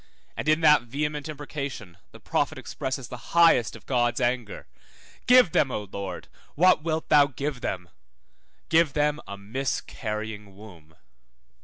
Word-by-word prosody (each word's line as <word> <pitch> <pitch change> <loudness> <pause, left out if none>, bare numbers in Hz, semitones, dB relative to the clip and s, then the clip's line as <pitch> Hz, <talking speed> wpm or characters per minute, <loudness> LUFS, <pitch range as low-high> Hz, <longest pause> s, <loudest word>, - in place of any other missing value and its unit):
And 155 - -2
in 155 +1 +3
that 150 -4 +6
vehement 150 +5 -4
imprecation, 140 - -6 0.2
the - - -14
prophet - - -1
expresses 130 -1 -5
the 125 +6 -10
highest 165 -9 +5
of - - -14
God's 120 -2 +1
anger, 120 -3 -2 0.6
Give 250 -7 +7
them, 145 - +2
O 105 - -3
Lord, 95 -2 -7 0.3
what 180 0 +5
wilt 160 0 -2
thou 145 -2 +6
give 140 -1 -4
them? 90 -2 -4 0.8
give 160 -3 +3
them 150 0 +1
a 100 - -7
miscarrying 105 -2 -5
womb. 85 -7 -15
130 Hz, 140 wpm, -26 LUFS, 105-150 Hz, 0.8 s, Give